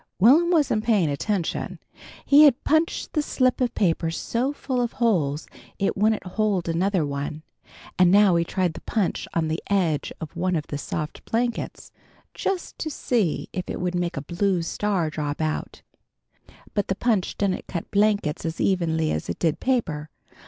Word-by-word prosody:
Will'm 285 - +6
wasn't 290 -11 +2
paying 205 -10 +2
attention. 175 +4 -2 0.5
He 290 +2 +8
had 275 -4 +4
punched 315 +2 +1
the 305 - +2
slip 255 -3 +1
of 245 -1 0
paper 165 -4 +1
so 235 - -1
full 260 -3 -2
of 240 -1 -2
holes 165 - +1 0.3
it 195 - 0
wouldn't 215 +1 +1
hold 195 -1 0
another 175 0 +1
one, 145 +2 -4 0.6
and 180 -1 +6
now 200 -1 +6
he 170 - +3
tried 180 0 -1
the - - -9
punch 210 -5 -1
on 165 -1 +1
the 160 +2 -2
edge 175 -7 +1
of 160 -2 -8
one 180 +1 0
of 155 -3 -1
the 145 - -4
soft 150 +1 -5
blankets, 235 +1 -2 0.4
just 380 -3 -3
to 315 - -2
see 230 - 0
if 185 - -4
it - - -3
would 180 0 -1
make 175 -3 -2
a 140 - -3
blue 175 +2 0
star 180 -3 -1
drop 150 -1 -3
out. 155 -1 -3 0.9
But 205 -2 0
the 195 - 0
punch 215 -4 0
didn't 195 -2 -1
cut 170 -3 -5
blankets 205 -7 +1
as 165 0 -4
evenly 160 -4 +1
as 80 - -3
it 85 - -3
did 160 -3 0
paper. 165 - -1
185 Hz, 175 wpm, -24 LUFS, 160-225 Hz, 0.9 s, He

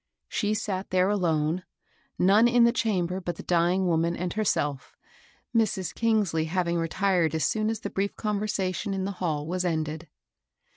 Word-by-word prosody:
She 215 -1 -1
sat 200 -3 -3
there 185 +1 +2
alone, 170 -3 0 0.5
none 205 +5 +5
in 240 0 +4
the 235 - +5
chamber 190 -6 -1
but 175 -1 -4
the - - -9
dying 175 +2 +2
woman 170 0 +1
and 180 0 -3
herself, 145 -10 -1 0.6
Mrs. 195 -6 +1
Kingsley 210 -9 +1
having 170 0 0
retired 165 -1 +1
so - - +1
soon 215 +7 0
as 225 -1 -3
the 200 - -5
brief 200 +1 -2
conversation 205 -2 -2
in 190 -1 -2
the 200 - -2
h^U 160 -6 -2
was 180 +3 -2
ended. 160 -1 -2
185 Hz, 160 wpm, -27 LUFS, 170-205 Hz, 0.6 s, none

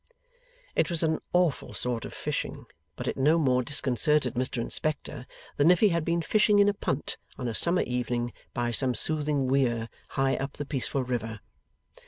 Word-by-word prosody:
It - - +2
was 170 -2 0
an 160 -1 +1
awful 175 -5 +1
sort 120 -2 0
of - - -8
fishing, - - -3 0.3
but - - -6
it - - -2
no 150 +5 +4
more 130 -5 +3
disconcerted 140 0 +1
Mr 125 +1 -2
Inspector 145 +1 -3 0.3
than 145 +3 +5
if 180 -1 +5
he 215 - +5
had 170 -3 0
been 170 +1 0
fishing 210 +1 +4
in 205 0 +6
a 205 - +3
punt 150 -8 -3 0.2
on 125 - -3
a 115 - -2
summer 175 +9 +2
evening 120 -1 -2 0.2
by 120 0 -1
some 125 +1 +1
soothing 150 -2 +1
weir 120 -4 +1 0.3
high 135 0 +2
up 135 +1 -4
the 145 - -5
peaceful 135 -1 -1
river. 115 -4 -3
135 Hz, 180 wpm, -28 LUFS, 125-160 Hz, 0.3 s, in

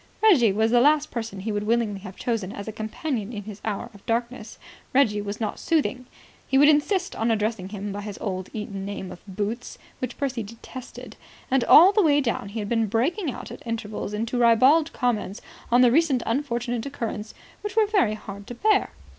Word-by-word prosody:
Reggie 285 - +6
was 220 +3 +1
the 240 0 +5
last 295 +2 +3
person 225 -5 -5
he 220 +3 -3
would 205 0 -1
willingly 225 -3 +1
have 190 -1 -10
chosen 225 -6 -2
as 205 0 -7
a - - -3
companion 220 +1 -4
in 210 -3 -6
his 210 0 -9
hour 220 +2 -3
of 200 - -16
darkness. 235 -1 -2 0.4
Reggie 215 -7 +3
was 205 0 -5
not 220 -2 -3
soothing. 275 -6 0 0.4
He 270 - +2
would 290 +2 +7
insist 360 +6 +2
on 225 +1 0
addressing 215 -3 -1
him 205 0 -5
by 205 +1 -5
his 205 -1 -7
old 185 -2 -4
Eton 205 -3 -5
nickname 195 -2 -5
of 180 - -11
Boots 210 +5 -4 0.2
which 255 - -4
Percy 265 -4 -2
detested. 230 +4 -10 0.3
And 265 -2 +3
all 360 +5 +9
the 420 - +3
way 295 -5 +4
down 235 -7 -2
he 210 - -7
had 210 -2 -3
been 225 0 +1
breaking 290 - 0
out - - -8
at - - -9
intervals 220 -3 -4
into 230 +3 -2
ribald 260 +8 +5
comments 230 - -1 0.3
on 245 +1 +6
the 245 -2 +6
recent 280 -3 +3
unfortunate 240 -2 -1
occurrence 225 -6 -5 0.3
which 415 -1 -5
were 440 -1 +5
very 395 - +2
hard 200 -1 -9
to 245 - -7
bear. 425 - +2
230 Hz, 200 wpm, -25 LUFS, 210-270 Hz, 0.4 s, all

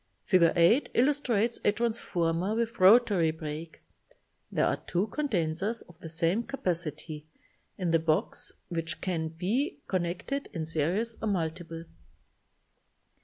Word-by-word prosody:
Fig. 185 -2 +4
8 175 - +4
illustrates 245 -4 +2
a - - +4
transformer 200 -5 0
with 230 0 -2
rotary 190 -4 +6
break. 160 0 -6 0.7
There - - +2
are - - +1
two 180 +4 +1
condensers 210 - -1
of 175 -1 -19
the 165 - -8
same 165 +6 +1
capacity 170 - -3 0.5
in 180 -3 -1
the 165 - +4
box 160 -1 -1 0.2
which 165 -2 -3
can 165 -4 -1
be 200 - -1
connected 185 +10 -2
in 160 -2 -3
series 175 +9 -1
or 225 - -1
multiple. 165 -3 -3
180 Hz, 120 wpm, -29 LUFS, 165-225 Hz, 0.7 s, rotary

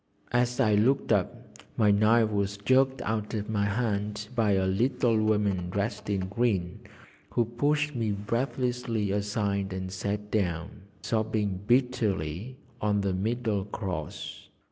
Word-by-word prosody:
As 125 +1 +1
I 110 -5 +4
looked 120 +7 +2
up, 100 -4 -1 0.2
my 105 -2 +5
knife 110 +2 +4
was 100 -1 -1
jerked 130 +4 +2
out 110 0 -2
of 105 +1 -3
my 100 -2 +1
hand 105 -1 -2
by 110 -4 +2
a 95 -1 +2
little 120 +5 +2
woman 105 -4 +1
dressed 100 +3 -2
in 100 -2 +1
green, 95 -2 -1 0.5
who 120 - +1
pushed 145 +6 0
me 115 -4 -1
breathlessly 115 0 -1
aside 100 -1 -1
and 95 0 -4
sat 100 +2 -3
down, 95 0 -1 0.2
sobbing 110 -4 0
bitterly, 120 - 0 0.2
on 105 -1 +2
the 100 -1 0
middle 110 0 -1
cross. 95 -7 -5
105 Hz, 135 wpm, -28 LUFS, 100-120 Hz, 0.5 s, my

